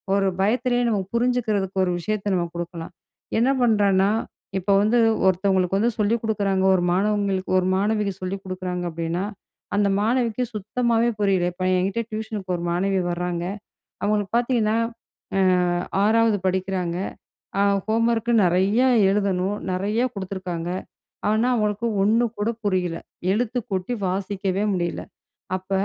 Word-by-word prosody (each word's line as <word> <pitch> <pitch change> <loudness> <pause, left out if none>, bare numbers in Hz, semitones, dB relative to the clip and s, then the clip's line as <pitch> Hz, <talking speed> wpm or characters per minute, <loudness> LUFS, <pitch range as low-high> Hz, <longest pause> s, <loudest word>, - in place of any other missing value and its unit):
ஒரு 195 -1 +2
பயத்துலே 245 +4 +1
நம்ம 210 -3 +1 0.2
புரிஞ்சுக்கிறதுக்கு 220 -6 0
ஒரு 180 - 0
விஷயத்த 205 +1 -2
நம்ம 175 -1 0
குடுக்கலாம். 170 0 -6 0.5
என்ன 250 +3 +3
பண்றான்னா, 200 -4 +3 0.5
இப்ப 200 +2 -1
வந்து 220 +4 +3 0.3
ஒருத்தவங்களுக்கு 190 0 +2
வந்து 235 +2 +2
சொல்லிக் 220 +2 +1
குடுக்கிறாங்க 200 -3 0
ஒரு 175 - +1
மாணவங்களுக்கு, 200 -1 0
ஒரு 185 - 0
மாணவிக்கு 205 -1 0
சொல்லிக் 195 +2 -4
குடுக்கிறாங்க 185 -1 -4
அப்டின்னா, 170 +3 -2 0.5
அந்த 205 -1 +3
மாணவிக்கு 240 +1 +1
சுத்தமாவே 235 +3 +1
புரியல. 190 -3 +2
இப்ப 185 +1 -3
என்கிட்ட 195 +5 -1
டியூஷனுக்கு 215 -4 -4
ஒரு 170 - -6
மாணவி 190 +2 +1
வராங்க. 175 0 -2 0.6
அவங்களுக்கு 205 +1 0
பார்த்தீங்கன்னா, 235 -3 +1 0.6
அ, - - +3 0.6
6வது 225 0 +4
படிக்கிறாங்க. 185 -2 -1 0.6
அ - - +4 0.2
ஹோம்வொர்க் 230 +1 +1
நெறையா 195 +8 +3 0.2
எழுதணும், 195 -1 0 0.2
நெறையா 210 +6 0
குடுத்துருக்காங்க. 185 -3 -4 0.6
ஆனா, 220 +3 +2
அவங்களுக்கு 210 +1 0 0.2
ஒண்ணு 225 +4 +3
கூட 210 +2 0 0.2
புரியல. 180 -4 0 0.3
எழுத்துக் 240 +2 -1
கூட்டி 190 +4 -2
வாசிக்கவே 195 +1 -1
முடியல. 175 -2 -2 0.5
அப்ப 185 +1 -16
200 Hz, 125 wpm, -23 LUFS, 185-220 Hz, 0.6 s, 6வது